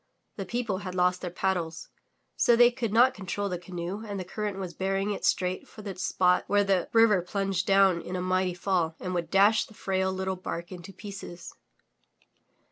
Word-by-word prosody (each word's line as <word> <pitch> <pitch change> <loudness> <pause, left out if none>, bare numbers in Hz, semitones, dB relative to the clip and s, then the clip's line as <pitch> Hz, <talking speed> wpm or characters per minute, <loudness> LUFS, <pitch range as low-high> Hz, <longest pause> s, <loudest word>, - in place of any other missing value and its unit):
The 195 - -5
people 230 -6 -2
had 185 -2 -6
lost 180 0 +2
their 180 - -3
paddles, 175 -2 -2 0.5
so 240 - +4
they 240 +1 +6
could 235 -3 -3
not 245 +4 +5
control 200 -1 -3
the 180 -2 -3
canoe 180 +3 -5
and 205 -3 -5
the - - -3
current 205 +1 -4
was 185 -3 -5
bearing 195 +2 -1
it 200 - -5
straight 185 0 0
for 215 - -12
the 195 -2 -5
spot 180 0 +2
where 205 0 +3
the 195 -3 +1
river 225 -4 +5
plunged 195 0 -2
down 195 -3 +4
in 180 - -6
a - - -1
mighty 185 0 0
fall 175 -3 0
and 185 - -4
would 175 -2 -2
dash 205 +3 +4
the 215 - -17
frail 190 -1 -1
little 190 0 -2
bark 175 -1 -6
into 185 +1 -9
pieces. 190 -3 -9
190 Hz, 195 wpm, -28 LUFS, 180-205 Hz, 0.5 s, they